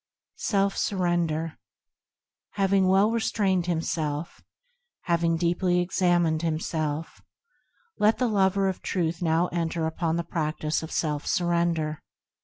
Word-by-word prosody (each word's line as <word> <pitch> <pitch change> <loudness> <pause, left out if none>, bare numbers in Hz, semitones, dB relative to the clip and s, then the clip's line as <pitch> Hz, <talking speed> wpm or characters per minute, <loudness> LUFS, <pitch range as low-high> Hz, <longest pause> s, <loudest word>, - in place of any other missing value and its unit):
3. - - -5
Self 200 -2 +2
Surrender 170 -4 -1 0.9
Having 195 -1 +2
well 195 +3 +4
restrained 195 -6 0
himself, 160 -2 -2 0.6
Having 170 -1 +1
deeply 175 +1 +1
examined 175 -3 +2
himself, 160 -1 -2 0.8
Let 215 +2 +4
the 250 +1 +1
lover 195 -2 +2
of 190 - -3
Truth 170 -2 -2
now 165 0 +2
enter 165 -1 -1
upon 160 0 -1
the 170 - -1
practice 155 -2 -2
of 160 - -7
Self 150 -2 -1
Surrender. 170 -3 0
170 Hz, 115 wpm, -26 LUFS, 160-190 Hz, 0.9 s, well